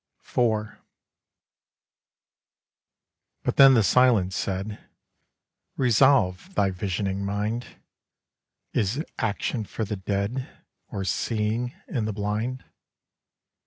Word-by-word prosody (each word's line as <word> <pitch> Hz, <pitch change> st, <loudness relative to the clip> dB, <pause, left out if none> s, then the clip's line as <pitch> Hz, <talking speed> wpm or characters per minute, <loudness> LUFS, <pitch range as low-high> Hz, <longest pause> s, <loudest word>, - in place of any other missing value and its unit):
IV 110 Hz, -3 st, 0 dB, 2.7 s
But -, -, -1 dB
then 135 Hz, -1 st, +9 dB
the 115 Hz, -, +4 dB
Silence 110 Hz, -6 st, +4 dB
said, 100 Hz, +2 st, -3 dB, 1.0 s
'Resolve 130 Hz, -, +3 dB
thy 95 Hz, -, +2 dB
visioning 95 Hz, +1 st, -2 dB
mind: 105 Hz, +4 st, -2 dB, 1.1 s
Is 120 Hz, -, 0 dB
action 110 Hz, +1 st, -1 dB
for 110 Hz, +2 st, -4 dB
the 105 Hz, 0 st, -4 dB
dead 100 Hz, +7 st, -2 dB, 0.4 s
Or 100 Hz, -, -4 dB
seeing 115 Hz, +4 st, -1 dB
in 115 Hz, -5 st, -2 dB
the 110 Hz, -, -2 dB
blind? 105 Hz, +5 st, -2 dB
105 Hz, 90 wpm, -26 LUFS, 100-125 Hz, 2.7 s, then